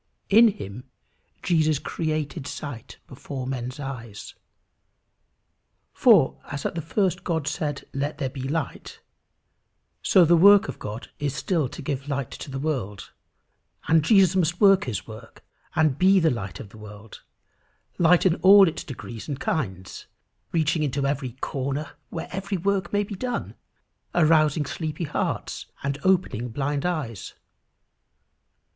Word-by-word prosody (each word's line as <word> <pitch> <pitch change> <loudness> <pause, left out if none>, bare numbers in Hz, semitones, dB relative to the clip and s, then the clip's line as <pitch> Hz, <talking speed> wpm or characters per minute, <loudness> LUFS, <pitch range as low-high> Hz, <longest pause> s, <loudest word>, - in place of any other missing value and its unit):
In 225 +4 +7
him 125 - -5 0.6
Jesus 155 -3 +2
created 155 -1 -3
sight 135 -8 -7
before 130 0 -7
men's 130 +1 -4
eyes. 120 -7 -7 1.6
For, 65 0 +4
as 145 -1 -6
at - - -1
the 165 - -3
first 185 +3 -1
God 160 -4 -2
said, 150 -3 -3
"Let 145 +2 -2
there 140 - -1
be 135 - -7
light," 145 +2 -4 1.0
so 185 -3 +5
the 170 +2 +5
work 200 +4 +7
of 135 - -7
God 110 +4 -7
is 145 -2 -2
still 145 +1 0
to - - -9
give 140 0 -3
light 140 -3 -2
to - - -8
the 135 - -5
world, 130 -9 -3 0.8
and 160 0 +5
Jesus 190 -1 +5
must 175 -1 +1
work 195 -2 +5
his 115 -8 -4
work, 110 -1 -12 0.3
and 155 -4 +2
be 190 +1 +5
the 160 -2 +3
light 100 -6 -5
of 100 - -9
the 110 +1 -15
world 105 0 -12 0.8
light 175 +1 +5
in 180 -2 +3
all 195 0 +8
its 165 - -3
degrees 120 -5 -8
and 140 -3 -4
kinds, 95 - -3 0.4
reaching 160 -1 +1
into 140 -1 -1
every 140 -3 -2
corner 140 +3 -3 0.2
where 180 +3 -5 0.2
work 195 -3 0
may 205 0 +1
be 205 - -7
done, 245 +5 -4 0.6
arousing 155 -2 +4
sleepy 155 +3 -4
hearts, 150 - -3 0.2
and 140 0 -2
opening 185 - +1
blind 145 +5 -2
eyes. 140 - -4
150 Hz, 140 wpm, -25 LUFS, 130-170 Hz, 1.6 s, all